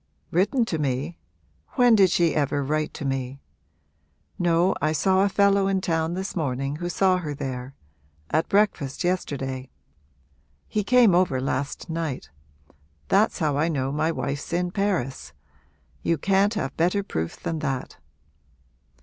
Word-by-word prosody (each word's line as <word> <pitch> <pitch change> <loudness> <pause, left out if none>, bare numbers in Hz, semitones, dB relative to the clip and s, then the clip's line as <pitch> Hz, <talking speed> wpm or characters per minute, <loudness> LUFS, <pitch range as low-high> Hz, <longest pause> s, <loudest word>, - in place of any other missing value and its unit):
'Written 205 +8 +2
to 165 -7 -3
me? 145 +4 -2 0.5
when 245 -2 +5
did 195 -4 +6
she 170 -3 +2
ever 145 -1 0
write 155 +2 -1
to 145 - -5
me? 135 0 -3 1.0
No, 175 +1 +3
I 155 +2 +1
saw 190 +4 +3
a 200 - +2
fellow 200 0 +3
in 195 -1 +1
town 165 -1 -1
this 190 +1 -4
morning 135 -3 -2
who 175 +2 -4
saw 185 0 +3
her 155 -5 -4
there 130 0 -5 0.6
at 155 +2 +1
breakfast 195 -10 +1
yesterday. 135 -7 -2 1.0
He 210 - -1
came 240 -2 +5
over 175 -7 +2
last 135 +4 -3
night. 160 - -4 0.8
That's - - +3
how 145 -2 0
I 160 - +2
know 135 -5 -1
my 155 +3 0
wife's 140 -1 -4
in 175 +1 0
Paris. 135 - -2 0.7
You 165 - +1
can't 195 +6 +2
have 135 -9 -3
better 180 +5 +1
proof 80 - -4
than 165 -1 -3
that!' 135 -4 -3
160 Hz, 145 wpm, -25 LUFS, 135-190 Hz, 1.0 s, did